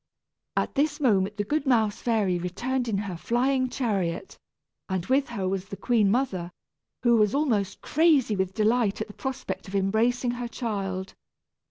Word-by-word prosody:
At -, -, 0 dB
this 295 Hz, +1 st, +1 dB
moment 205 Hz, -6 st, +2 dB
the 205 Hz, -, 0 dB
good 295 Hz, +6 st, -1 dB
mouse 220 Hz, -5 st, +2 dB
fairy 205 Hz, -7 st, +1 dB
returned 240 Hz, +9 st, -2 dB
in 215 Hz, -3 st, 0 dB
her 195 Hz, -3 st, -3 dB
flying 255 Hz, -, +1 dB
chariot, 200 Hz, -, -2 dB, 0.5 s
and 190 Hz, -2 st, -1 dB
with 270 Hz, +4 st, +2 dB
her 200 Hz, -6 st, -2 dB
was 190 Hz, 0 st, -2 dB
the 195 Hz, 0 st, -8 dB
queen 225 Hz, -5 st, +2 dB
mother, 200 Hz, -7 st, 0 dB, 0.5 s
who 235 Hz, -1 st, +5 dB
was 210 Hz, +2 st, +3 dB
almost 215 Hz, -10 st, 0 dB
crazy 295 Hz, -8 st, +3 dB
with 190 Hz, -1 st, -1 dB
delight 220 Hz, -1 st, +2 dB
at 220 Hz, -, -2 dB
the 210 Hz, -, -12 dB
prospect 200 Hz, -9 st, -5 dB
of 190 Hz, -, -6 dB
embracing 225 Hz, +6 st, +1 dB
her 245 Hz, 0 st, -4 dB
child. 195 Hz, -6 st, -3 dB
220 Hz, 165 wpm, -26 LUFS, 195-250 Hz, 0.5 s, who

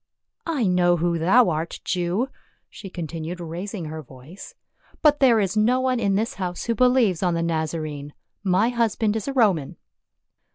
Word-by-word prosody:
" -, -, -53 dB
I 295 Hz, -9 st, 0 dB
know 175 Hz, -1 st, +3 dB
who 170 Hz, 0 st, 0 dB
thou 195 Hz, +7 st, +4 dB
art, 160 Hz, +2 st, -4 dB
Jew," 185 Hz, +8 st, -1 dB, 0.4 s
she 195 Hz, -, -9 dB
continued 165 Hz, 0 st, -6 dB
raising 175 Hz, +2 st, -6 dB
her 155 Hz, +1 st, -6 dB
voice, 135 Hz, +7 st, -13 dB, 0.2 s
" -, -, -32 dB
but 295 Hz, -1 st, +5 dB
there 245 Hz, -5 st, +5 dB
is 195 Hz, -1 st, -1 dB
no 230 Hz, +4 st, +3 dB
one 255 Hz, -1 st, 0 dB
in 200 Hz, -3 st, +1 dB
this 220 Hz, +4 st, -1 dB
house 180 Hz, -1 st, -3 dB
who 235 Hz, -, 0 dB
believes 245 Hz, -7 st, +3 dB
on 180 Hz, -3 st, +1 dB
the 165 Hz, -, -1 dB
Nazarene; 155 Hz, -3 st, -3 dB, 0.3 s
my 195 Hz, +4 st, +2 dB
husband 225 Hz, -3 st, 0 dB
is 220 Hz, -, -3 dB
a 275 Hz, -, -2 dB
Roman." 195 Hz, -, +1 dB
185 Hz, 175 wpm, -23 LUFS, 165-230 Hz, 0.4 s, but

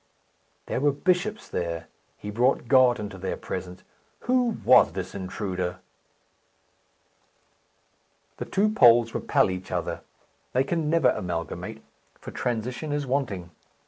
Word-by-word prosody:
There -, -, -2 dB
were 145 Hz, 0 st, +4 dB
bishops 185 Hz, +8 st, 0 dB
there. 85 Hz, -1 st, -3 dB, 0.3 s
He 105 Hz, -, -7 dB
brought 120 Hz, +3 st, +1 dB
God 125 Hz, -1 st, +5 dB
into 100 Hz, -2 st, -6 dB
their 95 Hz, +1 st, -3 dB
presence. 90 Hz, 0 st, -6 dB, 0.4 s
Who 245 Hz, -2 st, +1 dB
was 130 Hz, -, +6 dB
this 95 Hz, -1 st, -5 dB
intruder? 95 Hz, -2 st, -3 dB, 2.6 s
The -, -, -4 dB
two 205 Hz, +2 st, +2 dB
poles 120 Hz, -, +6 dB
repel -, -, +2 dB
each 95 Hz, 0 st, -6 dB
other. -, -, -3 dB, 0.5 s
They 130 Hz, -, +3 dB
can 155 Hz, +2 st, -1 dB
never 160 Hz, -5 st, +4 dB
amalgamate, 90 Hz, +3 st, -5 dB, 0.4 s
for -, -, -9 dB
transition 125 Hz, +5 st, -3 dB
is 145 Hz, -1 st, -1 dB
wanting. 115 Hz, -10 st, -2 dB
115 Hz, 120 wpm, -26 LUFS, 95-145 Hz, 2.6 s, was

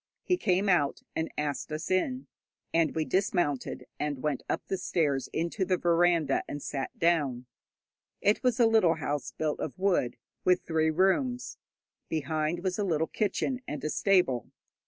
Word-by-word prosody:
He 360 Hz, -, +2 dB
came 200 Hz, -, +1 dB
out 175 Hz, -7 st, +2 dB
and 160 Hz, -, -2 dB
asked 150 Hz, 0 st, -2 dB
us 155 Hz, +3 st, -4 dB
in, 255 Hz, +8 st, 0 dB, 0.5 s
and 165 Hz, -2 st, +2 dB
we 160 Hz, -1 st, 0 dB
dismounted 175 Hz, -, 0 dB
and 145 Hz, -3 st, -2 dB
went 150 Hz, -4 st, 0 dB
up -, -, -1 dB
the 190 Hz, -, -2 dB
stairs 145 Hz, -8 st, 0 dB
into 170 Hz, +5 st, -1 dB
the 185 Hz, 0 st, +1 dB
veranda, 170 Hz, -4 st, +3 dB
and 145 Hz, -, -5 dB
sat 135 Hz, -1 st, -4 dB
down. 145 Hz, -8 st, +1 dB, 0.7 s
It 205 Hz, +2 st, +2 dB
was 250 Hz, -2 st, +1 dB
a 235 Hz, -, +6 dB
little 220 Hz, -7 st, +4 dB
house 145 Hz, -3 st, -3 dB
built 155 Hz, -1 st, -2 dB
of 155 Hz, -, -4 dB
wood, 185 Hz, -10 st, +1 dB, 0.3 s
with 180 Hz, 0 st, +3 dB
three 160 Hz, -1 st, +1 dB
rooms. 245 Hz, -, +1 dB, 0.5 s
Behind 155 Hz, +2 st, -1 dB
was 185 Hz, +1 st, -1 dB
a -, -, +2 dB
little 160 Hz, -4 st, +1 dB
kitchen 215 Hz, +8 st, -1 dB
and 145 Hz, -2 st, -5 dB
a 155 Hz, -, -1 dB
stable. 180 Hz, -, +2 dB
165 Hz, 160 wpm, -29 LUFS, 150-190 Hz, 0.7 s, a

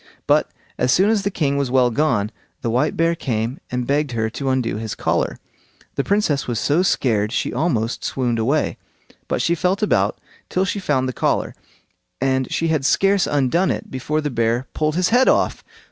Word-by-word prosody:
But -, -, +3 dB, 0.3 s
as 125 Hz, 0 st, +2 dB
soon 195 Hz, -, +4 dB
as 220 Hz, -2 st, +2 dB
the 200 Hz, -, -1 dB
king 140 Hz, -7 st, 0 dB
was 140 Hz, -2 st, 0 dB
well 125 Hz, -1 st, +3 dB
gone, 115 Hz, -6 st, +1 dB, 0.3 s
the 115 Hz, -, 0 dB
white 125 Hz, +2 st, +1 dB
bear 165 Hz, +1 st, +3 dB
came 120 Hz, -4 st, -2 dB
and 125 Hz, 0 st, -2 dB
begged 145 Hz, -1 st, 0 dB
her 110 Hz, -1 st, -1 dB
to 135 Hz, +3 st, -3 dB
undo 125 Hz, -5 st, 0 dB
his 110 Hz, -1 st, -4 dB
collar. -, -, -1 dB, 0.6 s
The 140 Hz, -, -1 dB
Princess 195 Hz, -8 st, +1 dB
was 120 Hz, -2 st, -1 dB
so 145 Hz, +9 st, +2 dB
scared 110 Hz, -, +1 dB
she -, -, -1 dB
almost 120 Hz, -5 st, -1 dB
swooned 120 Hz, -3 st, -1 dB
away; 140 Hz, +7 st, 0 dB, 0.5 s
but -, -, -1 dB
she 170 Hz, -, +2 dB
felt 180 Hz, +5 st, 0 dB
about -, -, +2 dB, 0.3 s
till 185 Hz, +1 st, +1 dB
she 200 Hz, +2 st, -2 dB
found 135 Hz, -8 st, 0 dB
the 130 Hz, -, -3 dB
collar, -, -, 0 dB, 0.7 s
and 130 Hz, -1 st, 0 dB
she 165 Hz, -, 0 dB
had 155 Hz, -3 st, +1 dB
scarce 195 Hz, +6 st, +3 dB
undone 145 Hz, +6 st, +1 dB
it -, -, -3 dB
before 150 Hz, +4 st, -2 dB
the 150 Hz, -1 st, -2 dB
bear 115 Hz, +1 st, 0 dB
pulled 155 Hz, 0 st, 0 dB
his 180 Hz, +1 st, +2 dB
head 250 Hz, +3 st, +4 dB
off. -, -, +1 dB
135 Hz, 190 wpm, -21 LUFS, 120-165 Hz, 0.7 s, soon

